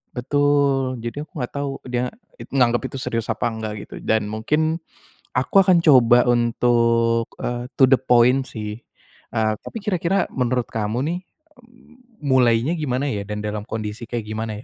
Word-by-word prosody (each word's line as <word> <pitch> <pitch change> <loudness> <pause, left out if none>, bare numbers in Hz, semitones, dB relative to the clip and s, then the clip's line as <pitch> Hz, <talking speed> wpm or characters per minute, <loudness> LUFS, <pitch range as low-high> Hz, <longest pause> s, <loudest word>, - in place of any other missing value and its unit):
Betul. 140 0 +1
Jadi, 120 +5 -4
aku 155 - -10
enggak 125 - -4
tahu 140 -1 -2
dia 125 0 -1 0.3
it - - -10
nganggep 120 -3 +2
itu - - -7
serius 115 -3 -3
apa - - -1
enggak, 110 -1 -5
gitu. - - -15
Dan, 110 -1 +1
mungkin 155 +9 0 0.5
aku 125 +8 -1
akan 180 -3 +4
coba 125 -5 +6
untuk, 115 -1 +2 0.2
eee, 120 0 -3
to - - +3
the 135 - +5
point, 125 +1 +3
sih. 105 -1 -6 0.6
Eee, 110 -1 +2
tapi - - -8
kira-kira 190 -1 0
menurut 125 -1 -1
kamu 110 +1 -2
nih, 175 - -3 0.4
mmm, 245 -2 -23
mulainya 125 -1 +3
gimana, 140 -1 -1
ya? 100 -2 -4
Dan 105 0 -4
dalam 105 0 -4
kondisi 110 +1 -5
kayak 120 -1 -3
gimana, 110 0 -5
125 Hz, 160 wpm, -22 LUFS, 115-140 Hz, 0.6 s, coba